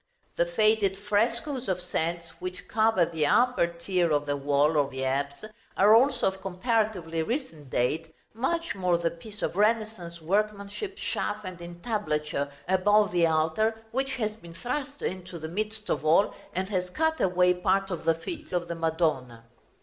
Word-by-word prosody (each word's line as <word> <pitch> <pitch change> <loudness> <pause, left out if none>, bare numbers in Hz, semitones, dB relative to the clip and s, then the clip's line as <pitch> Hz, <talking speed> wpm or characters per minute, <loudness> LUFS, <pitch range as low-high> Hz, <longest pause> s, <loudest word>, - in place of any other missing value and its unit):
The 170 - +2
faded 210 +1 +2
frescoes 230 +6 0
of 185 -1 0
saints, 170 -1 -2
which 180 0 -6
cover 220 -5 +3
the 160 -3 0
upper 250 -1 +4
tier 170 0 0
of 145 -1 +2
the 145 0 0
wall 145 +2 +2
of 140 -1 +1
the 130 -1 -4
apse, 140 +6 -2 0.3
are 205 +2 +7
also 260 +5 +4
of 190 0 -10
comparatively 190 -4 0
recent 160 - -4
date, 155 +7 0 0.2
much 335 +9 -1
more 180 -3 +1
the 170 -1 0
piece 210 +5 -9
of - - -1
Renaissance 215 -5 0
workmanship, 205 - -2
shaft 210 0 -2
and 180 -2 -7
entablature, 165 -6 -2 0.2
above 205 +3 +4
the 175 -2 +3
altar, 160 +8 +1
which 265 +1 -1
has 215 -4 -2
been 170 -6 -13
thrust 285 - -4
into 185 -1 -4
the 160 -1 -6
midst 215 +4 -4
of - - -1
all, 165 +7 +4 0.2
and 190 +1 -1
has 180 -2 -1
cut 320 - 0
away 180 -1 +4
part 190 +2 +1
of 180 - -4
the 165 0 +3
feet 310 - -7
of 175 -1 -1
the 170 - -3
Madonna. 155 -8 -1
185 Hz, 165 wpm, -28 LUFS, 165-215 Hz, 0.3 s, are